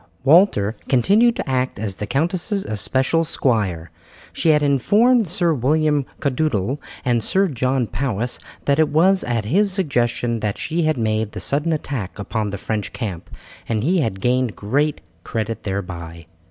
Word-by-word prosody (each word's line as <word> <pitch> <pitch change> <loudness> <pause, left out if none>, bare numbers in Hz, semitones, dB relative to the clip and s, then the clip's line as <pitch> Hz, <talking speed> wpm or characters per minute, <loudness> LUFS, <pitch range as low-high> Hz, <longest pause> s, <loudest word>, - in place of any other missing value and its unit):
Walter 135 - +4
continued 210 - +4
to - - -4
act 130 -1 -1
as 100 -2 -3
the 105 - -4
countess's 175 - -1
especial 130 +9 0
squire. 105 - 0 0.4
She 165 - +1
had 150 -1 +4
informed 210 - +3
Sir 170 -1 +1
William 150 +1 +1
Caddoudal 135 -3 -1 0.3
and 120 -2 +2
Sir 195 +1 +2
John 130 -3 0
Powis 120 -1 -3 0.3
that 140 +1 +2
it 155 - +4
was 185 +5 +3
at 115 -3 -1
his 195 - +2
suggestion 120 - 0
that 105 -2 -2
she 165 +2 -2
had 155 -3 +1
made 110 -2 -1
the - - -5
sudden 150 +4 0
attack 135 - -4
upon 105 +1 -3
the 100 - -4
French 105 +1 -3
camp, 95 -8 -5 0.4
and 110 -2 0
he 180 +6 +2
had 105 -10 -2
gained 125 -1 +1
great 145 +8 0 0.2
credit 115 0 -3
thereby. 85 -4 -5
130 Hz, 155 wpm, -21 LUFS, 110-155 Hz, 0.4 s, Walter